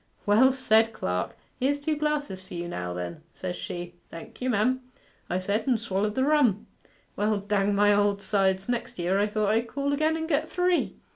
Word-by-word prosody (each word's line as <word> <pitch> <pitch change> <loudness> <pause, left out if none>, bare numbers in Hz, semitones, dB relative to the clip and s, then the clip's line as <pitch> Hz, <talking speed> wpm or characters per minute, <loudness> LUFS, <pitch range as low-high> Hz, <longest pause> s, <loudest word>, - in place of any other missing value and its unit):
"Well 225 +6 +5
said, 225 -4 +3
clerk! 90 - -3 0.2
Here's 285 +3 +1
two 305 +2 -1
glasses 295 -10 -2
for 185 -1 -10
you 175 0 -4
now, 90 - -4
then," 90 - -5
says 180 -1 -5
she. 175 0 -6 0.2
"Thank 165 +7 -11
you, 255 - 0
mem," 250 +3 +2 0.5
I 180 - 0
said, 200 +6 -1
and 245 -4 +3
swallered 210 -1 -1
the 260 - +2
rum. 275 -9 +3 0.5
Well, 210 0 +1
dang 200 0 0
my 205 +1 +5
old 205 0 +2
sides, 190 -1 +1
next 240 0 -3
year 180 +3 +1
I 205 - +2
thought 210 -1 0
I'd 225 +2 +1
call 280 +3 -1
again 310 +2 +1
and 320 0 -3
get 310 0 0
three. 360 -1 +1
210 Hz, 195 wpm, -27 LUFS, 190-265 Hz, 0.5 s, Well